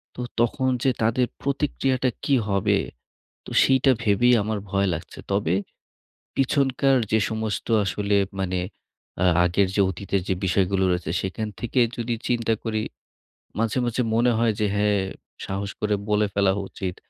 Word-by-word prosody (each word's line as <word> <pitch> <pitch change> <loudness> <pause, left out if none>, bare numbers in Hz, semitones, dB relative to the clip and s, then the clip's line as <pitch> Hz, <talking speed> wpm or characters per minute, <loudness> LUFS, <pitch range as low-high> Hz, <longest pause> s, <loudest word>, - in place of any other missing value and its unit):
তো - - -5 0.2
তখন 125 +3 +1
যে 135 - +4
তাদের 115 +3 +2
প্রতিক্রিয়াটা 135 -2 0
কী 140 - +3
হবে? 100 +1 +2 0.7
তো - - -9
সেইটা 135 0 +4
ভেবেই 115 +4 +4
আমার 110 0 -2
ভয় 100 0 +1
লাগছে। 85 - -7
তবে 100 -4 +1 0.8
পিছনকার 135 0 +2
যে 110 - +4
সমস্ত 110 -1 -3 0.2
আসলে 100 +2 0 0.2
মানে 95 -1 -1 0.6
আ - - +4 0.2
আগের 95 +2 +2
যে 100 - +4
অতীতের 95 +1 -2
যে - - +3
বিষয়গুলো 95 +1 +1
রয়েছে, 90 -2 -2
সেখান 100 +3 -3
থেকে 120 +2 -1 0.2
যদি 120 0 -2
চিন্তা 115 -2 +1
করি। 110 -2 -1 0.8
মাঝে, 115 +2 0
মাঝে 120 +1 0
মনে 120 +2 +3
হয় 115 -1 +3
যে, 105 - +3
হ্যাঁ, 105 -1 +2 0.5
সাহস 100 +1 -3
করে 105 -1 +1
বলে 105 0 +2
ফেলা 100 -1 +3 0.2
উচিত। 95 -2 -5
110 Hz, 145 wpm, -24 LUFS, 100-120 Hz, 0.8 s, যে